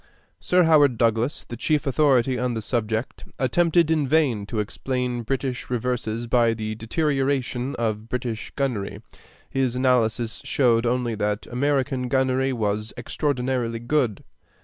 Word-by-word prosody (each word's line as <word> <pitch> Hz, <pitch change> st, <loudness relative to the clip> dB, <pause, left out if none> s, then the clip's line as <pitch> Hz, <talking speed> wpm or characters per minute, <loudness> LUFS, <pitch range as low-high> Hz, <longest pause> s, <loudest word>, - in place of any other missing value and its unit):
Sir 180 Hz, 0 st, +3 dB
Howard 145 Hz, -6 st, +5 dB
Douglas, 115 Hz, +4 st, +1 dB
the 120 Hz, -, -8 dB
chief 150 Hz, +5 st, 0 dB
authority 130 Hz, -2 st, +3 dB
on 125 Hz, -1 st, -1 dB
the 110 Hz, -, -2 dB
subject, 110 Hz, +1 st, -2 dB
attempted 165 Hz, +5 st, +2 dB
in 155 Hz, -3 st, +2 dB
vain 130 Hz, -9 st, +2 dB
to 110 Hz, -, -3 dB
explain 125 Hz, +3 st, -2 dB
British 130 Hz, +1 st, -3 dB
reverses 120 Hz, -2 st, -2 dB
by 115 Hz, -1 st, +3 dB
the 110 Hz, -1 st, -4 dB
deterioration 135 Hz, +1 st, -1 dB
of 110 Hz, -1 st, -2 dB
British 120 Hz, -4 st, -4 dB
gunnery. 125 Hz, -8 st, -2 dB, 0.4 s
His 130 Hz, -2 st, -1 dB
analysis 120 Hz, -3 st, +1 dB
showed 120 Hz, -3 st, +2 dB
only 120 Hz, -1 st, 0 dB
that 105 Hz, 0 st, -2 dB
American 135 Hz, 0 st, 0 dB
gunnery 130 Hz, +1 st, +1 dB
was 105 Hz, -2 st, -2 dB
extraordinarily 125 Hz, -3 st, -1 dB
good. 120 Hz, -3 st, 0 dB
125 Hz, 130 wpm, -24 LUFS, 115-135 Hz, 0.4 s, Howard